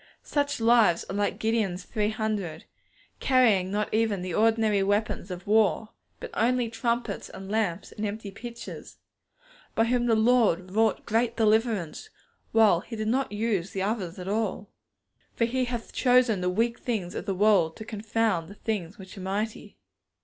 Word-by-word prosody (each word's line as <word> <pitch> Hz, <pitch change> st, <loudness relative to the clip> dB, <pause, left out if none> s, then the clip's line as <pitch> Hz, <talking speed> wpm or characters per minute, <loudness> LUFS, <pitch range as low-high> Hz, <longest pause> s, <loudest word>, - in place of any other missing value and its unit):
Such 285 Hz, -3 st, -1 dB
lives 225 Hz, -6 st, +4 dB
are -, -, -4 dB
like 205 Hz, 0 st, 0 dB
Gideon's 215 Hz, -5 st, -1 dB
three 210 Hz, -2 st, -1 dB
hundred, 215 Hz, -6 st, -3 dB, 0.5 s
carrying 225 Hz, -8 st, +3 dB
not 210 Hz, +2 st, -2 dB
even 215 Hz, -4 st, +1 dB
the 180 Hz, -2 st, -4 dB
ordinary 220 Hz, -1 st, +3 dB
weapons 205 Hz, -1 st, 0 dB
of 180 Hz, -1 st, -7 dB
war, 215 Hz, 0 st, +2 dB, 0.3 s
but -, -, -7 dB
only 240 Hz, 0 st, +1 dB
trumpets 235 Hz, -2 st, -2 dB
and 190 Hz, +1 st, -9 dB
lamps 205 Hz, -4 st, -1 dB
and 210 Hz, -, -7 dB
empty 210 Hz, -1 st, -4 dB
pitchers, 235 Hz, +3 st, -9 dB, 0.8 s
by 225 Hz, -, +4 dB
whom 240 Hz, +1 st, +1 dB
the 230 Hz, -, +4 dB
Lord 220 Hz, -6 st, +3 dB
wrought 220 Hz, +2 st, +1 dB
great 230 Hz, +2 st, 0 dB
deliverance, 220 Hz, -, +1 dB, 0.4 s
while 220 Hz, -6 st, +5 dB
He 225 Hz, +6 st, -8 dB
did 215 Hz, 0 st, -2 dB
not 265 Hz, +1 st, 0 dB
use 205 Hz, -4 st, -1 dB
the 190 Hz, -, -1 dB
others 195 Hz, -4 st, -2 dB
at 180 Hz, 0 st, -7 dB
all. 205 Hz, -1 st, -2 dB, 0.6 s
For 230 Hz, -, +2 dB
He 255 Hz, +2 st, 0 dB
hath 240 Hz, -2 st, -5 dB
chosen 245 Hz, -6 st, +3 dB
the 180 Hz, -, +1 dB
weak 230 Hz, +5 st, 0 dB
things 205 Hz, -8 st, -3 dB
of -, -, -6 dB
the 195 Hz, -, 0 dB
world 190 Hz, -5 st, +3 dB
to 220 Hz, -, -8 dB
confound 215 Hz, -5 st, -1 dB
the 200 Hz, -, -11 dB
things 205 Hz, -5 st, -4 dB
which 190 Hz, -1 st, -11 dB
are -, -, -7 dB
mighty. 205 Hz, +4 st, -4 dB
215 Hz, 165 wpm, -27 LUFS, 195-230 Hz, 0.8 s, while